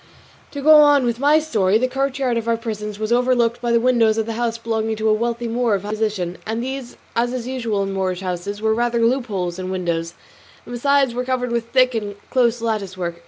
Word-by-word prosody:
To 285 -1 -7
go 310 +1 +8
on 290 -3 +5
with 235 -1 -1
my 290 +3 +4
story; 215 -11 +2
the 255 +3 +1
courtyard 270 -1 -1
of 230 0 -2
our 230 0 +2
prison 215 -2 -5
was 215 +2 0
overlooked 240 -1 +2
by 240 -1 -1
the 235 - +4
windows 230 -3 +3
of 220 - 0
the 225 - -4
house 230 0 -2
belonging 225 -1 -2
to 220 0 -1
a - - +4
wealthy 235 +2 -1
Moor 230 -2 +1
of 195 - -4
high 205 - -5
position; 210 -5 -2
and 225 +2 -3
these, 265 -1 -6 0.2
as 240 +1 0
is 250 -2 -4
usual 230 -6 -1
in 195 0 -3
Moorish 185 -1 -2
houses, 190 +3 -4
were 220 0 +3
rather 235 0 +1
loopholes 210 -9 -1
than 185 0 -5
windows, 170 -2 -2 0.5
and - - -9
besides 275 +1 +2
were 250 +1 -2
covered 250 -1 -2
with 235 -1 -2
thick 255 0 +3
and 205 -3 -3 0.2
close 240 -2 +2
lattice 205 -5 -2
work. 170 -2 -4
230 Hz, 225 wpm, -20 LUFS, 210-250 Hz, 0.5 s, go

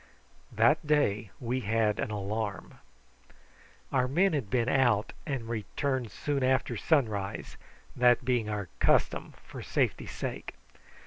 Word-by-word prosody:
That 120 +8 +3
day 115 -9 +2
we 125 0 -1
had 110 -1 +1
an - - -1
alarm. 105 0 -4 1.1
Our 130 -1 +2
men 180 +8 +2
had 135 -9 -2
been 120 +1 +1
out 120 -6 +2
and 135 -6 -3
returned 120 +2 -2
soon 140 +6 -2
after 130 -1 +1
sunrise, 110 -7 0 0.4
that 125 0 +4
being 120 -4 +1
our 105 -3 -3
custom - - +2
for - - -9
safety's - - -1
sake. - - -5
120 Hz, 125 wpm, -29 LUFS, 105-135 Hz, 1.1 s, that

